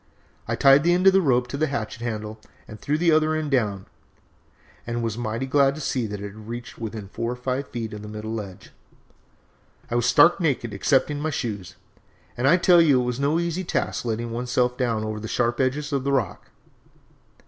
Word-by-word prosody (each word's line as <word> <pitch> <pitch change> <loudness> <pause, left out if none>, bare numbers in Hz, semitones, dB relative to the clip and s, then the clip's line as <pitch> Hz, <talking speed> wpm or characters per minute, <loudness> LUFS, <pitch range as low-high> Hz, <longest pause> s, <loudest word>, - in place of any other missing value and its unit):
I - - -1
tied 135 +1 +6
the 175 +1 +4
end 180 +1 0
of 195 - +7
the 195 - +5
rope 125 -6 +2
to 140 - -4
the 155 +2 +1
hatchet 115 -4 -4
handle 110 -2 -4 0.3
and 110 - -10
threw 150 +2 -1
the 170 +1 +3
other 155 0 +3
end 155 -2 -3
down, 105 -7 0 1.0
and 120 0 -2
was 115 -2 -2
mighty 115 +2 -3
glad 135 0 +3
to - - -7
see 125 -5 -1
that 105 -1 -6
it 100 -1 -7
reached 115 +3 -8
within 110 -3 -6
four 115 +4 -3
or - - -4
five 130 +2 -3
feet 115 -3 -5
of 105 - -7
the 105 - -9
middle 105 +1 -6
ledge. 100 -5 -7 1.2
"I - - -2
was 120 0 +2
stark 170 +8 +5
naked 135 - -1
excepting 140 +7 +1
my 155 +2 -1
shoes, 105 - -4 0.6
and 125 +3 0
I 170 +6 +6
tell 175 -1 +6
you 145 -6 +4
it 125 - 0
was 125 +1 -3
no 145 +4 +1
easy 170 +2 -2
task 150 -6 -2
letting 115 0 -3
one's 120 +2 -4
self 125 0 +1
down 115 -4 -1
over 110 0 -4
the 110 - -6
sharp 120 +1 0
edges 140 +3 -1
of 135 -2 0
the 140 - 0
rock. 125 -9 -2
125 Hz, 215 wpm, -24 LUFS, 110-145 Hz, 1.2 s, of